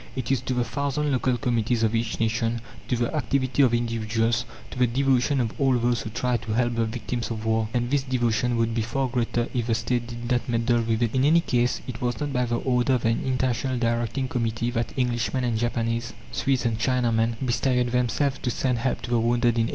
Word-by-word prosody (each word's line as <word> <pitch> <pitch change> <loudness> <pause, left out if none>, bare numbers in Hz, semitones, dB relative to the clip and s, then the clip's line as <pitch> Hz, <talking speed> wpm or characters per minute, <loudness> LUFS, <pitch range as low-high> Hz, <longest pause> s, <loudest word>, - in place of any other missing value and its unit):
It 130 -1 -3
is 135 -3 +2
to 125 0 -2
the 125 - +2
thousand 140 +4 -1
local 130 -1 +1
committees 120 -2 0
of 110 0 +2
each 115 0 -1
nation; 115 +1 0 0.3
to 125 - +1
the 120 +4 -1
activity 135 0 +1
of 130 -4 +5
individuals, 115 0 0 0.3
to 125 - -7
the 125 - +4
devotion 135 +2 +2
of 115 -3 0
all 135 -2 +4
those 120 0 +1
who - - -5
try 125 +2 0
to 115 -2 -5
help 120 +1 +1
the 115 -1 +1
victims 120 +1 -4
of 110 -1 -4
war. 110 -1 +1
And 120 0 -1
this 145 -1 +3
devotion 125 -2 0
would 115 0 +1
be 115 - 0
far 130 +4 -1
greater 120 -1 -1
if 120 -2 -1
the 115 - +2
State 120 +1 -1
did 120 +1 -6
not 125 0 0
meddle 115 0 +2
with 115 0 0
it. 115 - 0
In 130 0 +2
any 160 +4 +5
case, 125 -4 0
it 125 -3 -6
was 125 0 -1
not 145 -2 -2
by 125 -1 +1
the 120 0 -1
order 125 +1 +1
of 125 - 0
an 115 0 +2
International 130 0 0
Directing 120 +2 0
Committee 115 -1 -1
that 120 -1 -2
Englishmen 125 +1 0
and 120 -2 0
Japanese, 115 0 -1 0.2
Swedes 135 -3 0
and 115 -1 0
Chinamen, 115 -2 +1
bestirred 125 0 +1
themselves 130 +3 +1
to 125 - -2
send 125 0 0
help 130 +2 -1
to 120 - -5
the 120 - +3
wounded 120 +1 +2
in 115 -1 +1
1871. - - -4
120 Hz, 230 wpm, -25 LUFS, 115-130 Hz, 0.3 s, of